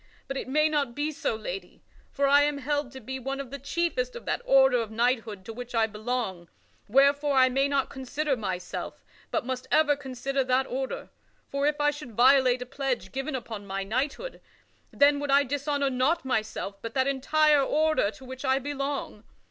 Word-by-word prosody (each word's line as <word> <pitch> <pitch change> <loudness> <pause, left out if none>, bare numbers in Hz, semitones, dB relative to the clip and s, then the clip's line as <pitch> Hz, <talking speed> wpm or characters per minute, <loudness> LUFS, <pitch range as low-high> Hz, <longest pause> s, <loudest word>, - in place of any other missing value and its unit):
But 270 - -4
it 270 - -4
may 305 +4 +3
not 285 -6 -1
be 295 +2 -1
so, 275 - -2
lady; 195 -4 -7 0.3
for 280 - 0
I 285 +1 +6
am 290 0 +1
held 290 -1 -2
to 265 - -8
be 265 +1 -6
one 270 +2 -4
of 270 -2 -6
the 280 - -6
chiefest 345 - -1
of 480 - -8
that - - -1
order 265 -2 +5
of 225 - -5
knighthood 225 -3 -1
to 225 - -7
which 245 +1 -7
I 225 -1 +4
belong, 215 -5 -4 0.4
wherefore 280 +4 +4
I 260 -1 +6
may 270 +2 +2
not 280 -2 0
consider 275 +2 -2
myself, 185 -6 -5 0.2
but - - -1
must 255 0 -4
ever 300 -2 +4
consider 270 0 -2
that 255 +1 +2
order. 265 +1 -4 0.4
For 280 +1 +1
if 295 -1 0
I 295 0 +3
should 290 -5 -9
violate 255 +1 +5
a - - -13
pledge 255 -7 -3
given 270 +2 -3
upon 220 -5 -6
my 195 0 -3
knighthood, 270 - -3 0.5
then 285 0 +4
would 290 0 -4
I 280 +1 +5
dishonor 285 0 -1
not 265 +6 +1
myself, 215 -5 -2
but 230 0 -7
that 260 -1 +3
entire 295 +2 +3
order 310 -4 +2
to 220 +5 -12
which 260 +1 -8
I 265 -1 +3
belong. 275 -5 -4
265 Hz, 195 wpm, -27 LUFS, 245-285 Hz, 0.5 s, I